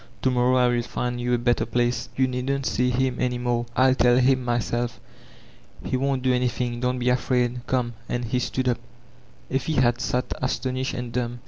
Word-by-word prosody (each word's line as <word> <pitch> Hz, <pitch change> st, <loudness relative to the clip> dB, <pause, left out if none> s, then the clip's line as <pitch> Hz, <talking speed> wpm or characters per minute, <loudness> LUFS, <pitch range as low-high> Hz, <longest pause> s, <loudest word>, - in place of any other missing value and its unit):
To 130 Hz, -, +3 dB
morrow 125 Hz, 0 st, +3 dB
111 125 Hz, -1 st, +2 dB
find 120 Hz, 0 st, -2 dB
you 125 Hz, 0 st, +1 dB
a -, -, +1 dB
better 120 Hz, -1 st, +1 dB
place. 120 Hz, 0 st, 0 dB
You 130 Hz, 0 st, +2 dB
needn't 130 Hz, +2 st, -2 dB
see 125 Hz, 0 st, +1 dB
him 125 Hz, 0 st, 0 dB
any 125 Hz, -1 st, 0 dB
more. 120 Hz, -1 st, -1 dB
Til 130 Hz, 0 st, +5 dB
tell 120 Hz, -1 st, +4 dB
him 130 Hz, 0 st, +3 dB
myself. 120 Hz, 0 st, -1 dB, 0.9 s
He -, -, -1 dB
won't 135 Hz, 0 st, 0 dB
do 130 Hz, -1 st, +3 dB
anything, 125 Hz, -1 st, -1 dB
don't 125 Hz, +1 st, 0 dB
be 125 Hz, 0 st, 0 dB
afraid 125 Hz, -1 st, +1 dB
Come." 125 Hz, -2 st, 0 dB, 0.2 s
And 120 Hz, 0 st, -2 dB
he 125 Hz, +2 st, 0 dB
stood 130 Hz, +1 st, -2 dB
up. 120 Hz, -2 st, +1 dB, 0.7 s
Effie 135 Hz, +4 st, 0 dB
had 120 Hz, -3 st, +2 dB
sat 125 Hz, -1 st, 0 dB, 0.2 s
astonished 130 Hz, 0 st, -2 dB
and 125 Hz, -1 st, -5 dB
dumb. 120 Hz, 0 st, -2 dB
125 Hz, 190 wpm, -24 LUFS, 120-130 Hz, 0.9 s, Til